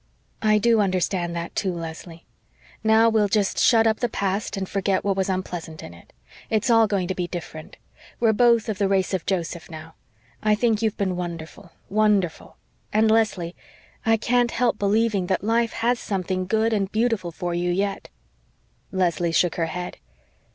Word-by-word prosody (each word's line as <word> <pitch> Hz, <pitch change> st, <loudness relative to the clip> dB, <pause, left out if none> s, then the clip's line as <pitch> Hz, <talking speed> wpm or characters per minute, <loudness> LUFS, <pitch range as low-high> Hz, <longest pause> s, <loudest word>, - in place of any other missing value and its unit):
"I 215 Hz, -1 st, +4 dB
DO 230 Hz, +1 st, +3 dB
understand 185 Hz, -2 st, 0 dB
that, 170 Hz, 0 st, -5 dB
too, 190 Hz, -, 0 dB
Leslie. 165 Hz, 0 st, -8 dB, 0.6 s
Now, 220 Hz, +1 st, +5 dB
we'll 220 Hz, -2 st, +3 dB
just 200 Hz, 0 st, 0 dB
shut 225 Hz, -2 st, +5 dB
up 220 Hz, -1 st, +2 dB
the 245 Hz, -, 0 dB
past 200 Hz, +2 st, -2 dB
and 190 Hz, -1 st, -3 dB
forget 195 Hz, -1 st, 0 dB
what 200 Hz, -1 st, +1 dB
was 190 Hz, 0 st, -1 dB
unpleasant 175 Hz, -4 st, -4 dB
in 85 Hz, -, -9 dB
it. 85 Hz, -, -17 dB, 0.4 s
It's 220 Hz, +3 st, +1 dB
all 225 Hz, -1 st, +5 dB
going 195 Hz, -4 st, -1 dB
to 190 Hz, -, -1 dB
be 180 Hz, -1 st, -3 dB
different. 165 Hz, -3 st, -8 dB, 0.4 s
We're 225 Hz, -2 st, +3 dB
both 235 Hz, 0 st, +4 dB
of 215 Hz, -2 st, -3 dB
the 200 Hz, -, +2 dB
race 195 Hz, -1 st, +1 dB
of 185 Hz, -, -2 dB
Joseph 175 Hz, -2 st, -3 dB
now. 160 Hz, 0 st, -10 dB, 0.5 s
I 215 Hz, 0 st, +3 dB
think 220 Hz, 0 st, +1 dB
you've 220 Hz, -2 st, 0 dB
been 190 Hz, -3 st, -1 dB
wonderful 170 Hz, 0 st, -7 dB
wonderful. 205 Hz, -5 st, 0 dB, 0.4 s
And, 215 Hz, +1 st, +3 dB
Leslie, 195 Hz, -6 st, +1 dB, 0.5 s
I 225 Hz, 0 st, +3 dB
can't 240 Hz, +2 st, +2 dB
help 235 Hz, -2 st, 0 dB
believing 205 Hz, -2 st, +1 dB
that 190 Hz, 0 st, 0 dB
life 230 Hz, +1 st, +1 dB
has 235 Hz, +1 st, 0 dB
something 185 Hz, -2 st, -2 dB
good 220 Hz, +2 st, +1 dB
and 195 Hz, -2 st, -1 dB
beautiful 220 Hz, -6 st, 0 dB
for 175 Hz, +1 st, -4 dB
you 175 Hz, +1 st, -1 dB
yet." 195 Hz, +2 st, -2 dB, 0.8 s
Leslie 175 Hz, -2 st, 0 dB
shook 165 Hz, +1 st, +2 dB
her 165 Hz, -1 st, 0 dB
head. 180 Hz, +2 st, -5 dB
195 Hz, 175 wpm, -23 LUFS, 175-220 Hz, 0.8 s, Now